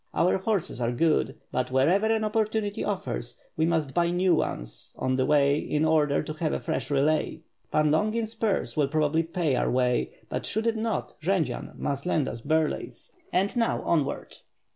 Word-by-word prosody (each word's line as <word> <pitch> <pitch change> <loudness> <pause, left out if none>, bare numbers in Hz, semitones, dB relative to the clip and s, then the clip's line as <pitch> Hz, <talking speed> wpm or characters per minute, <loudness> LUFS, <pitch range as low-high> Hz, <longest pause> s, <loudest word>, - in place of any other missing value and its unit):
Our 180 +2 +3
horses 190 - -1
are 120 0 +1
good, 150 +1 +1 0.2
but 130 0 -1
wherever 160 +12 +3
an 220 0 +1
opportunity 215 -1 -1
offers, 190 - -3 0.2
we 160 +1 +2
must 160 -5 0
buy 170 -1 +2
new 180 +1 +2
ones - - -3
on 130 0 0
the 130 0 +1
way 145 -1 +4
in 150 +1 0
order 150 -3 +2
to 155 - -5
have 155 0 -2
a - - -1
fresh 130 0 -3
relay." 150 +3 +1 0.3
"Pan 150 -1 +3
Longin's 215 +7 0
purse 220 -3 -1
will 150 -3 +2
probably 155 +2 +1
pay 165 -4 -1
our - - +1
way, 125 -1 +1 0.2
but - - -3
should 220 +2 0
it 230 -1 +2
not, 225 0 -2
Jendzian 160 -7 -1
must 140 +3 -3
lend 155 -6 +1
us 115 - -5
Burlay's, 155 +3 -1 0.2
and 195 +5 +1
now 230 -1 +1
onward!" 150 -5 -1
160 Hz, 180 wpm, -27 LUFS, 140-195 Hz, 0.3 s, way